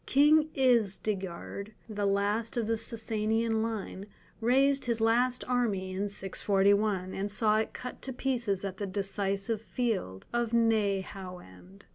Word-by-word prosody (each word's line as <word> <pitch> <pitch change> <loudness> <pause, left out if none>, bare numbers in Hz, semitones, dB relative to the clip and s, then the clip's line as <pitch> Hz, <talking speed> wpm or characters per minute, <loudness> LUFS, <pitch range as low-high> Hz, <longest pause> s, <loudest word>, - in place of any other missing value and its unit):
King 300 +3 +5
Isdigerd, 205 -5 0
the 205 -2 -1
last 205 +4 0
of 235 - +1
the 225 +1 +1
Sassanian 225 0 0
line, 210 -3 -4 0.3
raised 270 +4 +3
his 235 -2 0
last 245 +3 +2
army 215 -7 0
in 200 +2 -2
641, 195 0 +1
and 200 +1 -3
saw 215 0 +2
it 220 - -2
cut 250 - -7
to 265 - -4
pieces 235 -7 -1
at 190 -1 -5
the 205 - -3
decisive 195 +2 -1
field 220 - -2
of 240 -1 0
Nehauend. 190 - -1
215 Hz, 130 wpm, -30 LUFS, 195-235 Hz, 0.3 s, King